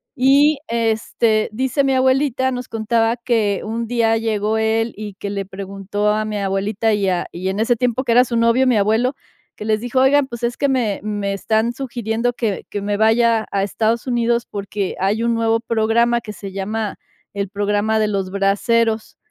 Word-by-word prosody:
Y, 280 +3 +4
este, 225 -1 0
dice 260 +5 0
mi 270 0 +2
abuelita, 260 0 +2
nos 250 -1 -5
contaba 225 +1 0
que 225 -5 0
un 230 +2 -3
día 230 -1 +2
llegó 220 -1 0
él 225 +1 0
y 210 -1 -7
que 200 +1 -5
le 200 -1 -2
preguntó 195 +2 -3
a 215 +1 +1
mi 215 -1 -3
abuelita 200 +3 0
y 200 -2 +1
a 180 -1 0
y 185 +2 -3
en 195 - -3
ese 230 +2 +2
tiempo 250 +2 0
que 240 - -1
era 245 +2 +6
su 235 -1 -2
novio 230 +3 +3
mi 245 - +3
abuelo, 220 +6 +1 0.4
que 210 - -8
les 215 0 +1
dijo, 245 +2 -1
oigan, 275 +1 +4
pues, 235 -1 -8
es 235 0 0
que 280 - +1
me 235 -7 0
me 205 -2 -2
están 220 +4 0
sugiriendo 240 -2 -2
que 220 -5 -2
que 205 - -4
me 205 0 -1
vaya 225 0 +3
a 195 -1 0
Estados 225 +4 0
Unidos, 235 -1 +1
porque 200 -1 -4
hay 205 +4 0
un 235 0 +1
nuevo 225 0 +1
programa 235 +1 +1
que 215 - -8
se 195 +1 -8
llama 205 +2 -3 0.4
el 200 -1 -3
programa 205 +2 0
de 215 - +2
los 195 -2 -2
braseros, 220 +3 0
225 Hz, 195 wpm, -19 LUFS, 205-235 Hz, 0.4 s, era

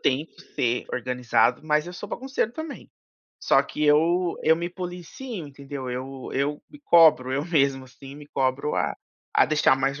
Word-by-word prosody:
tento 140 +4 -1
ser 120 0 0
organizado, 125 +1 +1
mas 150 +1 +1
eu 175 - -7
sou 200 +3 -8
bagunceiro 265 -2 -2
também. 315 +1 -8 0.5
Só - - +4
que 150 - -3
eu 170 +4 +3
eu 160 +1 +4
me 170 +1 -3
policio 180 - -7
entendeu. 140 -1 -7
Eu 130 +1 -6
eu 145 +2 -1
me 295 - -14
cobro, 160 - +5
eu 140 +2 -1
mesmo, 140 -5 +1
assim, 135 +1 -13
me 150 0 -12
cobro 135 +2 -1
a 80 -7 0 0.4
a - - +6
deixar 150 -3 +3
mais 135 +1 -1
145 Hz, 170 wpm, -25 LUFS, 130-170 Hz, 0.5 s, a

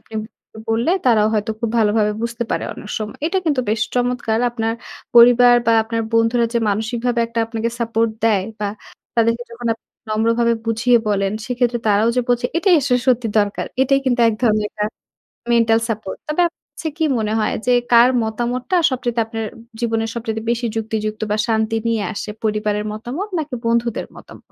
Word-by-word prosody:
আপনি 225 - -16 0.4
উ - - -9
বললে 230 +8 +1 0.2
তারাও 215 -3 +4
হয়তো 210 +1 0
খুব 230 -2 -1
ভালোভাবে 210 -1 +2
বুঝতে 235 0 -2
পারে - - -1
অনেক 210 - -10
সময়। 215 0 -6
এটা 380 +3 +1
কিন্তু 290 -5 +1
বেশ 220 0 0
চমৎকার! 245 -2 0
আপনার 225 -1 -1 0.4
পরিবার 245 +1 +8
বা 230 - +5
আপনার 225 0 -2
বন্ধুরা 230 +1 +3
যে - - +4
মানসিকভাবে 235 +3 -1
একটা 230 0 -5
আপনাকে 225 0 -2
সাপোর্ট 230 -1 +1
দেয় 205 -4 +3 0.2
বা 205 - 0 0.5
তাদেরকে 230 +1 +2
যখন 235 0 -7
আপ 225 - -8 0.3
নম্রভাবে 230 +2 +2
বুঝিয়ে 235 +2 +3
বলেন, 195 -1 +1
সেক্ষেত্রে 245 -1 0
তারাও 210 +3 +3
যে - - +4
বোঝে 245 0 +2
এটাই 360 +1 +4
আসলে 250 -2 +2
সত্যি 245 -2 +2
দরকার। 205 -1 0 0.2
এটাই 275 +1 +3
কিন্তু 245 -2 +1
এক 220 - 0
ধরনের 215 -2 +2
একটা 210 -1 -3 0.7
মেন্টাল 230 -1 +4
সাপোর্ট। 215 -3 -4
তবে 300 +4 0
আপ 340 - -4 0.3
কাছে 325 - -5
কি 320 - +2
মনে 215 -1 -1
হয়, 210 - 0
যে 250 - +4 0.2
কার 240 +2 +7
মতামতটা 240 - -1
সবচাইতে 245 -2 -1
আপনার 225 -1 -4
অ্যা - - -15 0.2
জীবনের 225 -1 -1
সবচাইতে 220 -1 -3
বেশি 240 0 0
যুক্তিযুক্ত 215 -1 -3
বা 210 - +2
শান্তি 220 0 0
নিয়ে 225 -2 0
আসে, 210 - -5
পরিবারের 210 -1 0
মতামত? 250 - -5
নাকি 300 -4 -4
বন্ধুদের 235 0 0
মতাম - - -13
230 Hz, 180 wpm, -19 LUFS, 220-245 Hz, 0.7 s, পরিবার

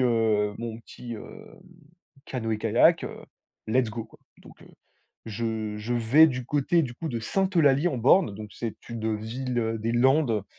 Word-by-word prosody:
heu 110 -4 +2
mon 115 -1 -5
petit 120 +1 -9
heu, 215 - -11 0.8
canoë 115 -4 -3
kayak. 115 +10 +3
Heu, - - -8 0.4
let's 120 +1 +1
go 115 0 -5
quoi». - - -20 0.2
Donc - - -16
heu, - - -16 0.6
je 110 -1 -3
je 105 +3 -4
vais 120 +7 +6
du 130 -4 -3
côté 150 +5 +1
du 125 -5 -5
coup 160 +6 -5
de 120 - -3
Sainte-Eulalie-en-Born. 150 - +2
Donc, 105 0 -9
c'est 115 -2 -5
une 110 -2 -2
ville 115 +1 -3
des 115 +2 -1
Landes 125 -4 +2
120 Hz, 155 wpm, -26 LUFS, 110-135 Hz, 0.8 s, vais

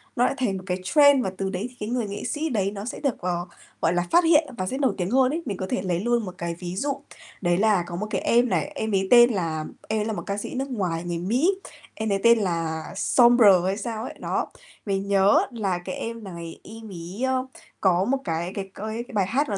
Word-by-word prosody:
nó 245 - +3
lại - - +1
thành 210 -7 0
một 185 - -9
cái 180 - 0
trend 285 +4 +5
và 190 - -2
từ 195 -1 -2
đấy 190 +3 -3
thì 250 - -19
cái 210 +1 -4
người 240 -3 -1
nghệ 200 +1 -6
sĩ 315 +2 -2
đấy 200 -6 0
nó 205 0 -6
sẽ 250 - -5
được, 275 -5 -1
ờ, 175 -1 -1 0.4
gọi 165 +2 +2
là, 175 0 0
phát 345 +1 +6
hiện 320 -1 +4
và 185 - -2
sẽ 265 - -2
nổi 270 -3 +2
tiếng 180 0 -1
hơn 260 +1 +4
ấy. 330 - -2
Mình 200 -3 -3
có 185 - -3
thể - - -1
lấy 180 -3 -1
luôn 235 +2 +1
một 185 -1 -7
cái 170 0 -3
ví 180 0 -5
dụ, 280 +7 0 0.5
đấy 175 -2 +2
là 205 -3 +3
có 175 - -6
một 210 +4 -3
cái - - -1
em 240 +1 +3
này, - - 0
em 220 -5 -2
ấy 195 -1 +1
tên 240 0 +8
là 160 -5 -2 0.2
em 220 0 0
ấy 210 - -1
là 220 - -2
một - - -5
ca 200 0 -2
sĩ 210 - -5
nước 270 +2 -2
ngoài 175 -7 -2
người 175 -1 -3
Mỹ, 240 - +2 0.4
em 220 -1 -2
ấy 195 - +1
tên 235 0 +7
là 165 -4 -1
Sombr 240 +3 +5 0.2
hay 195 +2 0
sao 220 0 -4
ấy. - - -6
Đó, - - -1 0.4
mình 195 -1 -1
nhớ 200 0 +5
là 200 -7 -1
cái 185 - -4
em 230 0 -5
này 170 -4 -8
em 220 0 -10
ấy, 180 +6 -7
ơ, 260 0 0 0.4
có 185 0 +3
một 275 +3 +1
cái 170 +1 -2
cái 195 -1 -5
coi 220 +3 -4
cái - - -13
bài 200 -3 +2
hát 280 +6 0
nó 200 - -1
205 Hz, 265 wpm, -25 LUFS, 185-240 Hz, 0.5 s, tên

